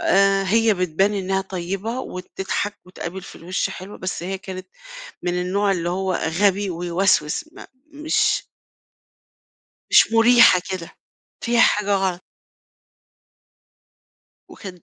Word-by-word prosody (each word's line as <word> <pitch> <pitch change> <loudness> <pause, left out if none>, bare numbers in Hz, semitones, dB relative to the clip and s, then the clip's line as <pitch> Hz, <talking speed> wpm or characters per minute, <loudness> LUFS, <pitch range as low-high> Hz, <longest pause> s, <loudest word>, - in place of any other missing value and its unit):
آآ، 195 0 +3
هي 225 +3 +3
بتبان 185 +3 +1
إنها 190 -1 -1
طيبة 195 +5 -4
وبتضْحك 195 +1 -4
وتقابل 180 0 -7
في - - -11
الوِش 180 +2 -2
حلو، 190 +3 -9
بس 185 -2 -4
هي 190 +2 -4
كانت 185 -1 -8 0.5
من 180 0 -1
النوع 195 +3 +1
اللي 175 -2 -2
هو 190 +1 -1
غبي 195 +5 +1
ويوسوس، 175 -2 0
ما - - -12 0.3
مش 305 +2 +1 1.5
مش - - +6
مرِيحة 230 -5 +6
كده، 185 -3 -5 0.5
فيها 235 0 +2
حاجة 205 -1 +3
غلط. 190 -2 -1 2.3
وكانت 180 -4 -11
190 Hz, 115 wpm, -22 LUFS, 180-205 Hz, 2.3 s, مش